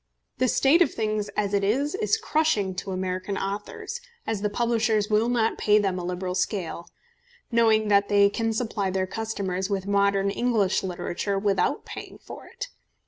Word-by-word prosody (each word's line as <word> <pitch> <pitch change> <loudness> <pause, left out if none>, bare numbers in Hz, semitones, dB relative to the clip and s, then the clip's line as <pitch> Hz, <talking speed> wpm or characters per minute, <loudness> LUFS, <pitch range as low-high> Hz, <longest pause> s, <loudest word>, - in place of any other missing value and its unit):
The 255 - +3
state 275 +8 +4
of 350 - +4
things 215 -1 -2
as 205 -1 0
it 200 -1 +2
is 270 +9 +1
is 430 +2 +1
crushing 310 - +1
to 185 +2 -5
American 185 +1 -3
authors, 205 - -5 0.2
as 215 -3 -2
the 210 - 0
publishers 225 -1 +1
will 215 +3 +3
not 230 -2 +1
pay 210 0 +4
them 195 -3 0
on 175 - -5
a - - -2
liberal 180 0 -3
scale, 180 -2 -2 0.6
knowing 220 -2 +4
that 200 0 +4
they 200 0 +5
can 225 +2 -1
supply 220 -4 -1
their 190 0 0
customers 190 -3 -3
with 195 -2 -1
modern 200 0 +2
English 220 -5 +1
literature 190 +2 -3
without 195 -1 0
paying - - -8
for - - -11
it. - - -7
205 Hz, 175 wpm, -25 LUFS, 195-225 Hz, 0.6 s, they